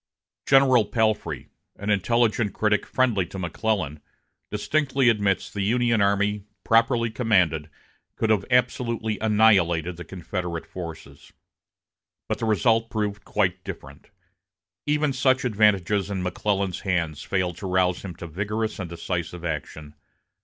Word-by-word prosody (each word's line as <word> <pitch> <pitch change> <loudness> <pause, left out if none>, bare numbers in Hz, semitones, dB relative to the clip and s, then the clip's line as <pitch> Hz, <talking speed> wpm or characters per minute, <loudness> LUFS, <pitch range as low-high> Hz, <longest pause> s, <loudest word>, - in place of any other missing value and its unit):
General 130 -4 +5
Palfrey, 110 0 -1 0.3
an 100 +1 -3
intelligent 110 +2 +1
critic 105 -1 +1
friendly 120 -7 +1
to 95 - -9
McClellan, 90 -3 -2 0.5
distinctly 135 +4 +1
admits 100 -4 +1
that 105 - -7
the - - +1
Union 115 +1 +2
army, 100 0 +1 0.2
properly 115 0 +3
commanded, 90 -10 +1 0.5
could 110 - 0
have 105 -3 +2
absolutely 120 -3 0
annihilated 95 -6 +3
the 90 - -7
Confederate 90 -1 -5
forces. 80 -5 -9 0.9
But - - -2
the - - -1
result 115 +1 +2
proved 105 -2 -3
quite 95 -3 0
different. 70 -4 -10 0.8
Even 150 -1 +1
such 130 0 +2
advantages 105 -3 +2
in 95 -2 -3
McClellan's 95 0 -1
hands 85 -6 -1
failed 90 -3 -1
to 100 - -5
rouse 90 -1 +1
him 90 -3 -7
to 85 - -8
vigorous 105 +6 -3
and 90 -3 -5
decisive 85 0 -4
action. 75 -2 -5
100 Hz, 130 wpm, -24 LUFS, 90-115 Hz, 0.9 s, General